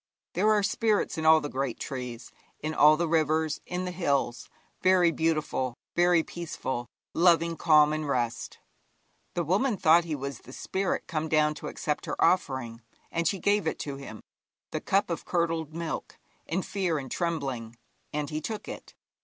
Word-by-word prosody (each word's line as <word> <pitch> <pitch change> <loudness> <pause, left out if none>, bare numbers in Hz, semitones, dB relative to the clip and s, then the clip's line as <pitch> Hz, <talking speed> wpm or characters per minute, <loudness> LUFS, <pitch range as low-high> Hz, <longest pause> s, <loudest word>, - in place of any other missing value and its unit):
There 200 +5 +2
are 210 -1 +4
spirits 210 -4 +1
in 160 - 0
all 160 0 +7
the - - -3
great 135 -3 -3
trees, 125 -3 -6 0.3
in 155 +1 -3
all 150 0 +6
the 170 +1 0
rivers, 160 -1 +1
in 180 0 -2
all - - -3
the 180 - -3
hills 140 -8 -1 0.3
very 185 -2 +5
beautiful, 155 -6 0 0.2
very 175 -1 +4
peaceful, 130 -8 -5 0.3
loving 170 -1 +4
calm 150 -2 +5
and 155 -1 -3
rest. 120 -4 -2 0.8
The 175 - +1
woman 200 - +1
thought 170 0 +5
he 160 -2 -2
was 140 -2 -5
the 130 - -13
spirit 190 +5 -2
come 160 -2 -3
down 150 -1 +3
to - - -8
accept 150 -1 -3
her - - -4
offering, 130 -9 +1 0.3
and 170 -1 0
she 195 - +1
gave 205 0 +1
it - - -1
to 140 -2 -5
him 110 -6 -9 0.5
the - - -3
cup 195 -2 +1
of 170 - -3
curdled 165 -3 -1
milk 165 -2 -4 0.3
in 180 +3 -1
fear 185 -5 -1
and 135 -3 -6
trembling, 135 -10 -2 0.4
and 150 0 -3
he 155 0 -2
took 215 +6 -5
it. - - -9
160 Hz, 175 wpm, -28 LUFS, 140-175 Hz, 0.8 s, all